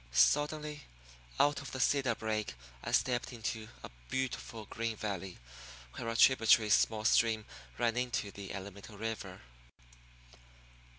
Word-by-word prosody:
Suddenly, 150 - +2 0.5
out 145 0 +3
of 140 - -7
the 130 - -4
cedar 135 0 +2
brake 110 - -2 0.3
I - - -4
stepped 125 -1 +1
into 110 -2 -4 0.2
a - - -8 0.2
beautiful 125 -4 -3
green 115 +1 -3
valley 95 -3 -4 0.6
where 115 - -4
a 115 - -2
tributary 115 -4 +6
small 110 +1 +3
stream 110 -2 +3 0.3
ran 115 -1 +1
into 125 -5 -1
the 100 -1 -8
Alamito 100 +2 -8
River. 105 -4 -5
115 Hz, 125 wpm, -33 LUFS, 105-125 Hz, 0.6 s, tributary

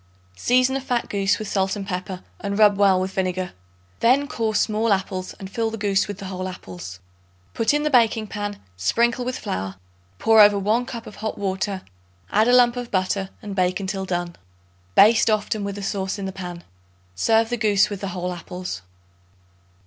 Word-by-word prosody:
Season 255 - +2
a 270 - -1
fat 245 -2 -1
goose 195 -1 +1
with 215 - -5
salt 195 0 0
and 200 -1 -5
pepper, 185 -1 -4 0.2
and 200 0 -3
rub 210 -2 +6
well 195 -2 +4
with 185 +1 -2
vinegar. 185 -1 -1 0.5
Then 270 +5 +4
core 225 -6 -2
small 215 +2 +1
apples 190 -1 -1
and 195 - -6
fill 225 +3 -1
the 225 - -5
goose 205 -2 +1
with 205 -2 -6
the 195 - -8
whole 185 -1 -4
apples. 90 - -8 0.5
Put 225 - +2
in 295 0 +1
the 300 - 0
baking 230 -3 +4
pan, 205 -1 -5 0.2
sprinkle 235 - +1
with 255 +1 -3
flour; 95 +1 -4 0.4
pour 225 -1 +6
over 205 -1 +7
1 220 +5 +1
cup 235 -3 -6
of - - -11
hot 220 0 -4
water; 190 0 -2 0.5
add 215 +2 +4
a - - +4
lump 245 -1 +5
of 245 -1 -4
butter 190 0 0
and 205 -2 -5
bake 185 0 +1
until 190 0 -3
done. 175 -2 -3 0.6
Baste 220 +2 +6
often 215 0 0
with 200 0 -3
the 205 - -6
sauce 195 0 -2
in 200 - -4
the 190 - -3
pan. 180 -2 -7 0.5
Serve 225 - +2
the - - +2
goose 210 -2 +3
with 200 - -5
the 200 - -3
whole 180 0 -3
apples. 180 - -6
200 Hz, 195 wpm, -23 LUFS, 185-225 Hz, 0.6 s, over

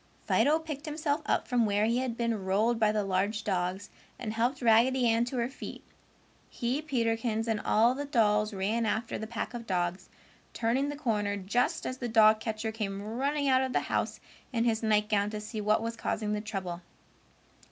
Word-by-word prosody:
Fido 300 +2 +4
picked 315 -1 -7
himself 300 0 -1
up - - +1
from 245 -2 +2
where 205 0 +2
he 235 +2 +1
had 250 -3 -2
been 230 -4 -1
rolled 215 +5 +1
by 215 -1 +4
the 210 -1 0
large 200 +3 0
dogs 185 0 -2 0.3
and 220 -3 -4
helped 240 +4 0
Raggedy 240 +2 +4
Ann 230 +1 +3
to 250 +1 -4
her 235 -1 +1
feet. 265 - -9 0.7
He, 250 +4 -2
Peterkins, 230 -5 -1
and 220 -2 0
all 230 +3 +3
the 285 +2 -4
dolls 215 -6 +2
ran 215 +4 0
after 220 +2 -2
the 220 - -5
pack 230 +1 -4
of 235 -1 -7
dogs, 180 -1 -1 0.5
turning 250 +5 +1
the 290 - -4
corner 210 -8 -1
just 200 +6 0
as 255 0 -4
the 245 - -3
dog 220 -1 +6
catcher 220 0 -3
came 205 -3 -4
running 275 +7 -1
out 260 -1 +4
of 260 -1 -2
the - - +2
house - - -2 0.3
in 230 -3 +1
his 225 -2 +1
nightgown 210 -2 +2
to 210 0 -5
see 215 +1 -5
what 215 +1 +2
was 230 0 -3
causing 215 -2 -2
the 210 - -2
trouble. 190 -5 -5
225 Hz, 195 wpm, -29 LUFS, 210-245 Hz, 0.7 s, dog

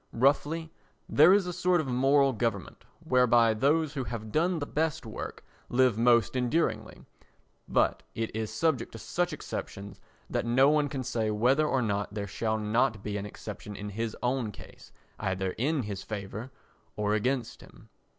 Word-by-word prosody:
Roughly, 150 +6 +1 0.4
there 155 +5 +6
is 200 -1 +4
a 180 - -4
sort 180 0 +2
of 155 - -1
moral 135 +2 +3
government 115 0 -3 0.2
whereby 120 -3 +4
those 145 +6 +1
who 135 -4 -3
have 110 -3 -6
done 170 - +1
the 145 - -3
best 160 -1 -1
work 110 - -7 0.2
live 125 -2 +3
most 115 0 +3
enduringly, 130 +7 -1 0.6
but - - +2
it 115 -1 -3
is 110 -1 -3
subject 155 -8 0
to - - -7
such 175 +9 -1
exceptions 100 -9 -7 0.3
that - - -1
no 130 +4 +4
one 150 -1 +2
can 135 -2 -4
say 110 -2 -1
whether 125 +8 +3
or 130 -4 +1
no 100 -2 -1
there 105 -1 -4
shall 110 +2 -2
not 110 0 0
be 105 -1 -3
an 100 0 -4
exception 105 0 -8
in 105 +1 -6
his 110 +2 -4
own 125 -3 0
case - - -14 0.3
either 95 0 -1
in 145 +2 +1
his 100 -2 -5
favour 105 +4 -6 0.5
or 105 0 0
against 125 +3 -1
him. - - -17
120 Hz, 170 wpm, -29 LUFS, 110-145 Hz, 0.6 s, there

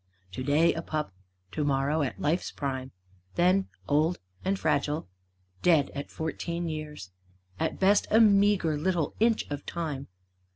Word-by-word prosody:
Today 145 - +2
a 165 - -3
pup; 155 - -3 0.4
to 150 - -1
morrow 145 +2 +1
at 135 - -2
life's 165 +5 0
prime; 130 -2 -4 0.5
Then 185 +2 +3 0.2
old 155 +4 +2 0.3
and 195 +1 0
fragile; 145 - 0 0.5
dead 160 -6 +4
at 140 - -5
fourteen 170 +2 -3
years. 150 - -6 0.5
At - - -1
best 200 +2 +4
a 220 - +5
meagre 200 -7 +4
little 170 -2 0
inch 225 0 +3
of 145 0 -4
time. 150 -5 -4
155 Hz, 135 wpm, -28 LUFS, 145-180 Hz, 0.5 s, a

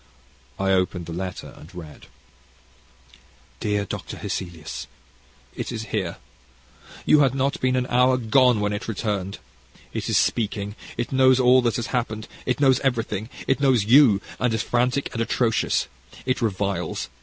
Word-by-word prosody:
I 95 0 +1
opened 90 -2 0
the 85 - -6
letter 90 +1 -5
and 80 +4 -14
read: 80 -4 -10 1.5
DEAR 105 -1 0
DR. - - -4 0.2
HESSELIUS. 85 -4 -5 0.7
It - - -4
is 110 -2 -4
here. 95 -6 -2 0.9
You 150 - +6
had 135 -2 +3
not 135 +1 0
been 130 0 +2
an 125 -1 +1
hour 125 +1 +3
gone 125 -1 +3
when 105 0 0
it 105 - -5
returned. 100 -3 -2 0.6
It - - -3
is - - +3
speaking. 105 -2 0 0.2
It 120 +1 -3
knows 130 -1 +5
all 130 0 +6
that 120 -2 0
has 120 +1 -4
happened. 110 -3 -2 0.2
It 125 -2 0
knows 135 -3 +4
everything 115 -4 -1 0.2
it 135 - +1
knows 130 -7 +3
you, 120 -3 +6 0.2
and 125 -2 +1
is 110 - -1
frantic 125 +3 0
and 115 - -2
atrocious. 115 0 +1 0.4
It 130 0 0
reviles. 100 -3 -2
115 Hz, 155 wpm, -24 LUFS, 100-130 Hz, 1.5 s, You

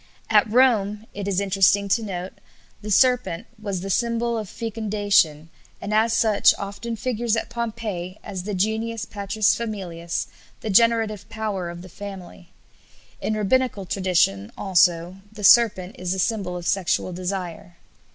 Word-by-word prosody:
At 215 0 +5
Rome, 220 -4 +3
it 200 -1 -5
is 195 -2 +1
interesting 200 0 +3
to 225 - +2
note, 185 -3 -5 0.5
the 210 - -7
serpent 245 -4 +2 0.2
was 200 -4 -3
the 195 +1 -4
symbol 235 +2 0
of 215 -4 -4
fecundation, 205 -8 0 0.3
and 205 - -4
as 220 +2 +3
such 220 -2 +4
often 200 +4 -5
figures 240 -1 -1
at 225 0 -3
Pompeii 220 -6 -4
as 190 -2 -5
the 200 +2 -4
genius 220 +3 -1
patrisfamilias, 200 -4 -1 0.4
the 220 - -3
generative 220 -1 +3
power 210 -5 -3
of 170 +1 -8
the - - -10
family. 190 -2 -10 0.7
In 215 - -1
Rabbinical 215 -1 +1
tradition, 175 - +1
also, 175 -1 +2
the 215 -1 -10
serpent 195 -4 +5
is 180 0 -1
the - - -4
symbol 190 -2 -1
of 175 - -8
sexual 185 -1 0
desire. 180 -1 -5
200 Hz, 140 wpm, -23 LUFS, 185-225 Hz, 0.7 s, At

